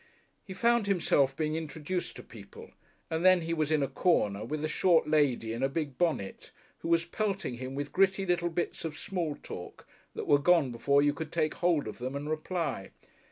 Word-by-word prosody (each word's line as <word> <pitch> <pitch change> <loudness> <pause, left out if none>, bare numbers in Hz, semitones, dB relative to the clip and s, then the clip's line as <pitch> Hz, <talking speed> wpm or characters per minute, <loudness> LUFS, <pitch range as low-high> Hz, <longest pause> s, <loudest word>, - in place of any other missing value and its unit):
He 190 - -9
found 235 +1 +2
himself 145 -8 +2
being 155 -1 -1
introduced 160 +3 -4
to - - -9
people, 460 0 -13 0.4
and 160 +1 -1
then 185 -1 +6
he 165 0 -2
was 155 -2 0
in 155 -2 +3
a - - 0
corner 105 - +1
with 150 +6 -4
the - - +1
short 165 0 +3
lady 140 -7 +2
in 115 - -4
a 135 - +2
big 145 -3 -4
bonnet, 160 - -1 0.3
who - - -6
was 165 0 +2
pelting 195 - -2
him 130 +1 -5
with 145 +1 -4
gritty 195 0 +3
little 175 -1 +1
bits 170 +1 -3
of 155 -2 -5
small 170 -6 -3
talk 90 - -10 0.3
that - - -4
were 145 - +4
gone 160 -3 +3
before 140 +4 +2
you 145 0 +3
could 160 0 -6
take 155 -2 0
hold 170 -8 +1
of 110 - -7
them 130 +3 -4
and 145 +2 -4
reply. 155 - -3
155 Hz, 205 wpm, -30 LUFS, 140-175 Hz, 0.4 s, then